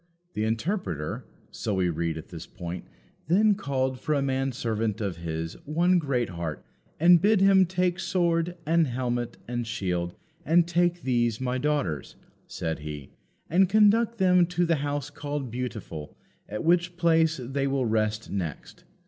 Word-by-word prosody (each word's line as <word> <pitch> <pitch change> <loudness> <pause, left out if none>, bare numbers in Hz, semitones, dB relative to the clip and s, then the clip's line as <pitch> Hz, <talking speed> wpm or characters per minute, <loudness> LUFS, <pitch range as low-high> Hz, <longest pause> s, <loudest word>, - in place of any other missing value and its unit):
"The 105 - -1
Interpreter," 110 - -2 0.3
so 105 - -2
we 90 -2 +1
read 80 0 -2
at 80 - -9
this 85 -2 -8
point, 90 -2 -7 0.4
"then 205 +6 +4
called 130 -8 -2
for 155 +3 0
a 140 - +1
man 135 0 0
servant 115 -3 -2
of 100 -6 -3
his, 80 -1 -4
one 175 +4 +3
Greatheart, 115 - -2 0.3
and 170 +1 +7
bid 210 +1 +4
him 190 -1 +5
take 180 0 0
sword, 175 -2 0
and 165 0 +3
helmet, 120 -1 -2
and 120 -1 -3
shield, 90 -6 -2 0.3
and 170 +2 +4
take 175 0 +1
these, 120 -3 +1
my 130 0 -1
daughters," 130 - -1 0.3
said 80 -1 -3
he, 75 -2 -7 0.4
"and 185 +3 +3
conduct 215 +2 +4
them 180 -3 +4
to 175 0 0
the 165 -1 +2
house 145 0 -3
called 145 -4 -4
Beautiful, 110 -11 -6 0.3
at 105 +1 -4
which 175 +1 +2
place 165 -2 +3
they 135 +2 -2
will 135 -2 0
rest 110 0 0
next. 85 -7 -5
135 Hz, 155 wpm, -27 LUFS, 105-175 Hz, 0.4 s, and